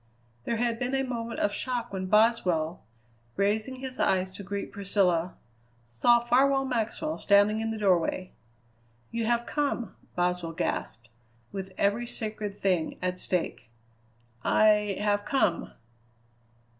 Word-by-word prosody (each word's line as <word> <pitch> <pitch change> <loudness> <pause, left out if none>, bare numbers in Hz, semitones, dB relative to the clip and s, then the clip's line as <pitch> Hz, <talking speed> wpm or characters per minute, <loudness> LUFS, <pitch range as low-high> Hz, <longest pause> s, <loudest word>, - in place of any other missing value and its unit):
There 235 - 0
had 230 0 0
been 255 +1 -1
a 270 - +1
moment 235 -3 -4
of 205 - +1
shock 240 -3 -2
when 190 -1 -3
Boswell, 185 -7 +2 0.5
raising 215 +6 0
his 260 0 -6
eyes 185 0 +2
to 190 - -9
greet 200 +1 -5
Priscilla, 185 -4 +1 0.5
saw 235 - +4
Farwell 270 +3 +3
Maxwell 255 +5 -2
standing 205 +2 +4
in 225 0 -2
the 225 - -3
doorway. 185 -2 +1 0.8
"You 230 -1 -1
have 235 0 +1
come!" 280 - -2 0.2
Boswell 175 -1 0
gasped, - - -3 0.4
with 190 -1 -6
every 210 +4 +1
sacred 215 -3 -5
thing 180 -5 0
at 180 0 -2
stake. 180 -12 -2 0.7
"I 210 -2 +3
have 205 0 +1
come." 265 - 0
210 Hz, 130 wpm, -28 LUFS, 185-235 Hz, 0.8 s, saw